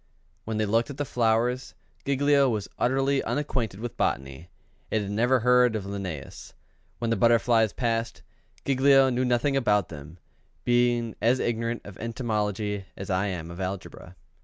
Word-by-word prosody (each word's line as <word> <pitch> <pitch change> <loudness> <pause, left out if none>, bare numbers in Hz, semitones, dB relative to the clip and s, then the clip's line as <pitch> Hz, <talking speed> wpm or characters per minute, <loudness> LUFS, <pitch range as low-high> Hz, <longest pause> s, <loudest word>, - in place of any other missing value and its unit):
When 110 0 -3
they 110 - +1
looked 115 +5 +1
at 140 - -7
the 145 - -2
flowers, 120 +1 0 0.3
Giglio 140 0 +3
was 105 -4 -2
utterly 135 +2 +2
unacquainted 120 -5 -2
with 120 +1 -6
botany, 70 +6 -2 0.4
and 110 -1 0
had 100 - -5
never 120 +4 +2
heard 125 -1 +4
of 105 - -2
Linn├"us. 95 -8 -6 0.4
When 115 -1 -2
the - - +3
butterflies 115 0 +3
passed, 115 0 -2 0.4
Giglio 135 0 +4
knew 125 +1 0
nothing 125 +3 +1
about 105 -8 +2
them, 80 +1 -10 0.5
being 120 -1 +2
as 120 +3 +3
ignorant 115 0 -2
of 100 -2 -11
entomology 105 -4 -2
as 95 0 -5
I 95 +2 +1
am 85 -3 -5
of 85 - -9
algebra. 95 -1 -6
115 Hz, 155 wpm, -26 LUFS, 100-125 Hz, 0.5 s, heard